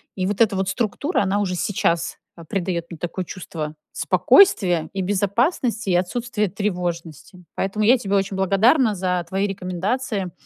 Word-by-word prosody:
И 185 - -1
вот 205 +2 -2
эта 215 -3 +4
вот 190 0 -1
структура, 245 - -1
она 200 +1 0
уже 190 -3 -1
сейчас, 170 -3 -1 0.2
а, 170 - -12
придаёт 175 -1 -2
мне 170 - -8
такое 175 +3 -4
чувство 160 -4 -6 0.2
спокойствия 180 - +4
и 195 - -2
безопасности, 205 - 0
и 180 - +3
отсутствия 210 +4 -1
тревожности. 180 -3 -4
Поэтому 195 +2 -1
я 250 +4 +6
тебе 200 -4 -2
очень 195 0 0
благодарна 215 - +3
за 180 -1 -1
твои 195 +3 0
рекомендации. 195 +2 -3
195 Hz, 155 wpm, -22 LUFS, 180-210 Hz, 0.2 s, я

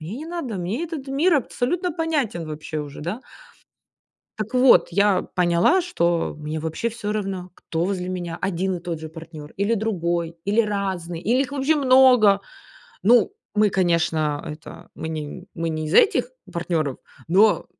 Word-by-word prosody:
мне 165 +8 -6
не 310 - -7
надо, 330 - -4
мне 185 - -3
этот 310 -5 -6
мир 310 +6 +3
абсолютно 315 +6 -1
понятен 295 - -1
вообще 155 0 -5
уже, 145 -1 -8
да. 175 +11 -4 1.2
Так 215 +3 -4
вот, 255 0 +6
я 200 -1 +3
поняла, 180 - +3
что 170 - 0
мне 155 +1 -4
вообще 160 +8 -2
всё 215 -2 -5
равно, 195 -4 -3
кто 165 +1 -3
возле 185 -1 -2
меня 175 -2 -4
1 190 0 -1
и - - -8
тот 170 -2 -5
же 160 - -6
партнёр, 160 -2 -10
или 200 +4 +1
другой, 170 -6 -1
или 205 +3 +3
разные, 190 -6 -2
или 240 +7 +2
их 275 - -5
вообще 285 +2 +1
много. 255 -7 +5 0.6
Ну, 230 -1 +5 0.2
мы, 210 -1 +4
конечно, 160 -5 +1
это 155 -1 -9
мы 160 - -5
не 160 +3 -6
мы 165 0 -2
не 155 -1 -3
из 155 - -3
этих 450 +3 +4 0.2
партнёров, 165 -5 -1 0.3
но, 200 +5 +4
190 Hz, 160 wpm, -23 LUFS, 165-240 Hz, 1.2 s, вот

